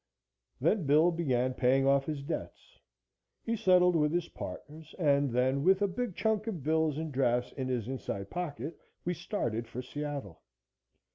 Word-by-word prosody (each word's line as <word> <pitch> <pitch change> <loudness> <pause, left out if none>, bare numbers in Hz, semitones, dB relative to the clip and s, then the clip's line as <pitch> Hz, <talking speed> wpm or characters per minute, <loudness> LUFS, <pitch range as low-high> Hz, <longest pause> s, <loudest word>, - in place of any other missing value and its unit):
Then 165 - +1
Bill 155 +5 +5
began 130 -7 0
paying 130 +2 +3
off 135 0 +3
his 150 -3 -3
debts. 160 - -6 0.6
He 230 - -1
settled 180 -4 +4
with 150 -2 +3
his 170 0 -1
partners, 155 +1 -9
and 145 -5 +3
then 130 +3 +1
with 190 +2 +5
a - - +3
big 200 0 -3
chunk 220 0 0
of 180 - -4
bills 160 -1 +1
and 160 -1 -3
drafts 125 -2 +1
in 130 -2 -4
his 120 -4 -2
inside 100 -7 -5
pocket 170 -2 -4 0.3
we 175 - 0
started 120 - -3
for 125 +3 -6
Seattle. 140 - -5
150 Hz, 160 wpm, -31 LUFS, 130-175 Hz, 0.6 s, Bill